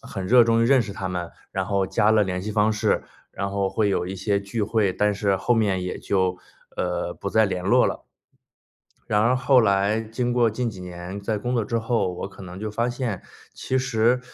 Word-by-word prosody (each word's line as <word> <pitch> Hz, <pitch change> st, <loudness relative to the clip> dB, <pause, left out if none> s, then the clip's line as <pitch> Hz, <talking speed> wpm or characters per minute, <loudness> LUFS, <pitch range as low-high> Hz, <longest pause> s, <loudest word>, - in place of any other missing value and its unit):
很 95 Hz, -, -6 dB
热 120 Hz, +3 st, +6 dB
衷 115 Hz, 0 st, +3 dB
于 -, -, +3 dB
认 135 Hz, -2 st, +5 dB
识 105 Hz, -3 st, -4 dB
他 95 Hz, -1 st, -4 dB
们， 90 Hz, -2 st, -4 dB, 0.2 s
然 95 Hz, -1 st, -2 dB
后 100 Hz, -2 st, +1 dB
加 105 Hz, +3 st, +2 dB
了 110 Hz, -1 st, +4 dB
联 90 Hz, -2 st, -2 dB
系 105 Hz, +2 st, -4 dB
方 105 Hz, +1 st, +3 dB
式， 105 Hz, -, +1 dB, 0.3 s
然 100 Hz, 0 st, -3 dB
后 100 Hz, -1 st, 0 dB
会 105 Hz, 0 st, 0 dB
有 95 Hz, -2 st, 0 dB
一 95 Hz, -, -5 dB
些 100 Hz, +1 st, 0 dB
聚 100 Hz, +2 st, -3 dB
会， 105 Hz, -3 st, +1 dB
但 105 Hz, +2 st, +1 dB
是 100 Hz, -1 st, +1 dB
后 95 Hz, +6 st, +1 dB
面 100 Hz, -5 st, +1 dB
也 90 Hz, -, -4 dB
就， 95 Hz, -2 st, 0 dB, 0.4 s
呃， -, -, -2 dB
不 -, -, -5 dB
再 110 Hz, 0 st, +4 dB
联 90 Hz, -2 st, -2 dB
络 125 Hz, +6 st, +4 dB
了。 -, -, -2 dB, 1.0 s
然 105 Hz, 0 st, +2 dB
而 120 Hz, +3 st, +3 dB
后 130 Hz, 0 st, +4 dB
来 100 Hz, +1 st, +2 dB
经 115 Hz, +2 st, -2 dB
过 120 Hz, -2 st, +3 dB
近 120 Hz, +3 st, -2 dB
几 95 Hz, -3 st, -11 dB
年， 90 Hz, +2 st, -7 dB
在 105 Hz, +1 st, -2 dB
工 125 Hz, +4 st, -2 dB
作 115 Hz, -, +1 dB
之 115 Hz, +2 st, -1 dB
后， 115 Hz, -5 st, 0 dB
我 90 Hz, -, -5 dB
可 100 Hz, 0 st, -13 dB
能 90 Hz, 0 st, -9 dB
就 105 Hz, 0 st, -4 dB
发 115 Hz, +3 st, -1 dB
现， 120 Hz, -6 st, -3 dB, 0.3 s
其 130 Hz, -, -1 dB
实， 125 Hz, -1 st, +2 dB
105 Hz, 245 characters per minute, -24 LUFS, 95-115 Hz, 1.0 s, 热